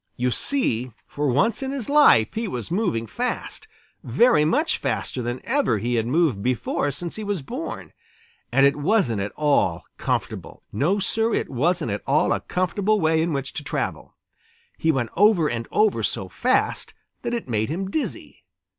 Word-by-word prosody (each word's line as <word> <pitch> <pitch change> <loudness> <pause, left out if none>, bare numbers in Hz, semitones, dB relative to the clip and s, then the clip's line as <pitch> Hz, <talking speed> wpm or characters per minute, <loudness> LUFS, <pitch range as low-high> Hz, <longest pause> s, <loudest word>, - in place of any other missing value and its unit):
You 125 +1 0
see, 130 - 0
for 145 0 -2
once 200 - +2
in 265 - -3
his 270 -5 -3
life 285 - +5
he 225 0 -2
was 125 - -5
moving 180 - 0
fast, 110 - -4 0.4
very 150 - +4
much 295 - +1
faster 130 - -2
than 120 +1 -3
ever 265 - +1
he 120 +4 -2
had 115 -1 0
moved 140 - +1
before 125 +4 -1
since 170 +7 -5
he 215 - -5
was 200 -7 -2
born. 260 - -6 0.6
And 135 0 +5
it 140 - +4
wasn't 145 - +1
at 100 - -3
all 145 - +1 0.2
comfortable. - - -3
No, 150 - +1
Sir, 225 +3 0
it - - -2
wasn't 155 - 0
at 100 - -3
all 145 +3 +3
a - - -1
comfortable 200 +3 0
way 160 -2 +2
in 165 +1 0
which 135 -2 -3
to - - -5
travel. - - -4 0.6
He 160 - +1
went 120 -6 -2
over 195 -4 +4
and 115 -4 -3
over 215 -1 +2
so - - -2
fast - - 0 0.3
that 240 0 -2
it 235 - -5
made 110 -2 -1
him 190 +5 -3
dizzy. 315 - -4
155 Hz, 175 wpm, -23 LUFS, -, 0.6 s, life